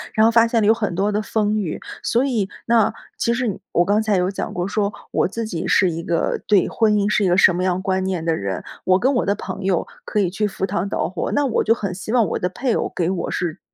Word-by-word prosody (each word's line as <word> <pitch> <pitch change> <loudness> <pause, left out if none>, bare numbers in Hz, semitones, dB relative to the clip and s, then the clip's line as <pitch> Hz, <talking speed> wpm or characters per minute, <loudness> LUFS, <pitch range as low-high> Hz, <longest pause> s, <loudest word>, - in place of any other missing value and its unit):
然 220 - +5
后 225 - +5
发 230 0 +5
现 230 -1 +1
了 - - +2
有 220 - +7
很 210 -6 -2
多 200 +3 +1
的 210 +1 0
风 215 0 0
雨， 180 -7 -3 0.2
所 240 +3 +1
以 220 -8 -1 0.2
那 225 -2 +3 0.3
其 235 - +1
实 240 -6 -2
我 175 - +3
刚 205 +3 +2
才 215 -3 +1
有 180 +1 +1
讲 195 - -4
过 175 +1 -2
说， 200 0 0 0.2
我 - - +2
自 225 +4 -4
己 175 -7 -4
是 185 -3 +3
一 165 +1 -4
个 170 0 -1
对 205 -4 +4
婚 220 -1 +2
姻 205 -1 +2
是 210 0 +2
一 - - +3
个 180 - +3
什 180 - +6
么 180 - -1
样 185 -1 +1
观 190 -2 0
念 185 -3 -2
的 165 -1 +1
人， 100 - -4 0.2
我 185 0 +4
跟 265 +3 +2
我 245 - +1
的 200 - +2
朋 - - -6
友 190 -2 +1 0.2
可 210 - -1
以 185 -4 +1
去 210 +3 0
赴 195 -1 -3
汤 195 0 -2
蹈 - - -1
火， 185 - -3
那 290 - +2
我 250 - +1
就 225 - +3
很 200 -5 -4
希 185 +4 -6
望 240 -3 +4
我 170 - -2
的 180 - -1
配 240 +6 -1
偶 - - -2
给 170 - 0
我 190 - -3
是 170 -3 -3
200 Hz, 295 characters per minute, -21 LUFS, 180-220 Hz, 0.3 s, 有